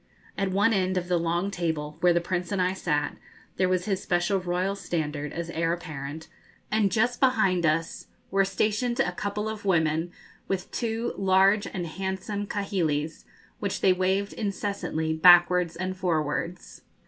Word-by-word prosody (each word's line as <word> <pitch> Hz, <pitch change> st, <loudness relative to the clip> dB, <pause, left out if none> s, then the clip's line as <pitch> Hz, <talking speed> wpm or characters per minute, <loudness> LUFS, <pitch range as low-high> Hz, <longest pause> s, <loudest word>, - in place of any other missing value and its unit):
At 195 Hz, -1 st, -1 dB
one 205 Hz, +4 st, +3 dB
end 185 Hz, -2 st, +1 dB
of 175 Hz, -1 st, -2 dB
the 175 Hz, -1 st, +2 dB
long 170 Hz, +4 st, 0 dB
table, 160 Hz, -5 st, -3 dB
where 180 Hz, -, +4 dB
the 170 Hz, -, +3 dB
Prince 175 Hz, +1 st, -3 dB
and 200 Hz, -, 0 dB
I 180 Hz, 0 st, +2 dB
sat, 150 Hz, -6 st, -1 dB, 0.4 s
there 185 Hz, 0 st, +2 dB
was 185 Hz, -1 st, +1 dB
his 195 Hz, -2 st, -1 dB
special 175 Hz, +2 st, +1 dB
royal 180 Hz, +2 st, -1 dB
standard, 150 Hz, -6 st, -3 dB
as 170 Hz, 0 st, -5 dB
heir 165 Hz, 0 st, 0 dB
apparent, 160 Hz, -2 st, -6 dB, 0.4 s
and 210 Hz, -2 st, +2 dB
just 240 Hz, +5 st, +1 dB
behind 190 Hz, -10 st, +3 dB
us 165 Hz, +2 st, -1 dB, 0.2 s
were 195 Hz, +1 st, +4 dB
stationed 215 Hz, +5 st, 0 dB
a 225 Hz, -, +2 dB
couple 205 Hz, +3 st, -3 dB
of 220 Hz, -1 st, -5 dB
women, 165 Hz, -3 st, +1 dB, 0.4 s
with 190 Hz, -2 st, -3 dB
two 230 Hz, 0 st, -2 dB
large 195 Hz, +2 st, +4 dB
and 175 Hz, -2 st, -4 dB
handsome 190 Hz, +4 st, -4 dB
kahilis, 165 Hz, -7 st, -2 dB, 0.3 s
which 200 Hz, -1 st, -2 dB
they 190 Hz, -, +5 dB
waved 190 Hz, +2 st, 0 dB
incessantly 200 Hz, -6 st, -2 dB
backwards 175 Hz, +1 st, +6 dB
and 185 Hz, +2 st, -3 dB
forwards. 170 Hz, -1 st, -2 dB
185 Hz, 160 wpm, -27 LUFS, 170-200 Hz, 0.4 s, backwards